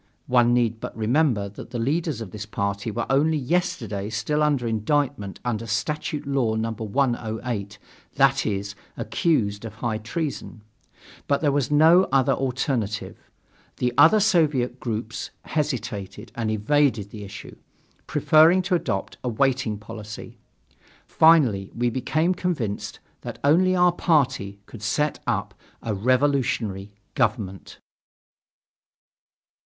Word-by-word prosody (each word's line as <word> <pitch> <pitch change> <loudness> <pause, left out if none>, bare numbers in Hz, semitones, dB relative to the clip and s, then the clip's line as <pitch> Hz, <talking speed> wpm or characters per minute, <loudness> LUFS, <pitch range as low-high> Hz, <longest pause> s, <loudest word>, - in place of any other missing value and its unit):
(One 120 -1 +4
need 120 -2 +1
but - - -7
remember 115 -2 +1
that 100 - -11
the 125 - -5
leaders 145 +1 -1
of 105 -5 -7
this 105 +1 -7
party 100 0 -2
were 115 +2 -2
only 155 +4 +2
yesterday 120 - -1
still 110 +8 -1
under 145 -5 +1
indictment 115 -1 -1
under 115 -1 -2
Statute 150 +6 -2
Law 135 -5 0
No. 115 +1 -1
108 110 -2 -2 0.4
that 135 -1 +3
is, 100 -1 -2 0.2
accused 105 -12 0
of 115 - -7
high 115 -3 -2
treason). 120 -2 -5 0.6
But 140 - +1
there 145 -3 +2
was 140 -3 0
no 160 +5 +6
other 135 -2 +3
alternative. 125 -5 -2 0.6
The 125 -1 0
other 165 +10 +6
Soviet 155 - +2
groups 115 -1 -4
hesitated 110 -7 -3
and 115 -2 -2
evaded 110 -1 +1
the 105 -2 -8
issue, 100 0 -10 0.5
preferring 165 +4 +5
to 180 +1 -1
adopt 95 - -2
a 125 - -1
waiting 125 -2 0
policy. 110 0 -9 0.7
Finally 135 -12 +4
we 120 +1 0
became 155 +8 0
convinced 155 - -3 0.2
that - - -7
only 180 +6 +4
our 180 0 +5
party 135 - +1
could 115 - -12
set 145 +8 0
up 105 -3 -1 0.3
a 115 - -2
revolutionary 120 -4 0 0.2
government. 105 -6 -2
120 Hz, 125 wpm, -24 LUFS, 105-145 Hz, 0.7 s, no